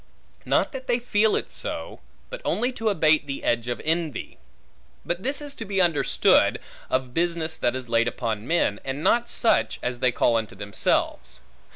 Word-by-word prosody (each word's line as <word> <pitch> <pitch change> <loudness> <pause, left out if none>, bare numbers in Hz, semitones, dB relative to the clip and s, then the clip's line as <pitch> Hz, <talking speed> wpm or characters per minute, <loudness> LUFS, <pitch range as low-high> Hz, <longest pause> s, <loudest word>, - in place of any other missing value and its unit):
Not - - +2
that 265 -1 -7
they 240 -1 +3
feel 220 -3 +2
it - - -3
so, - - -5 0.3
but - - -6
only 245 +3 0
to 225 -3 -1
abate 155 -5 +3
the 140 0 -5
edge 120 0 0
of 120 - -2
envy. 160 -4 -2 0.7
But 175 +1 -2
this 275 +6 -2
is 290 -1 -7
to - - -4
be 195 -2 -2
understood, 170 -5 +3 0.3
of 130 -1 -1
business 170 -1 0
that 120 - 0
is 130 -1 -5
laid 115 0 +2
upon 115 -2 -3
men, 160 -11 +1
and 135 +3 -4
not 235 0 +3
such, 230 - +2
as 125 0 -2
they 125 0 +3
call 120 -1 +2
unto 110 -3 -4
themselves. 95 -10 -1
155 Hz, 180 wpm, -25 LUFS, -, 0.7 s, they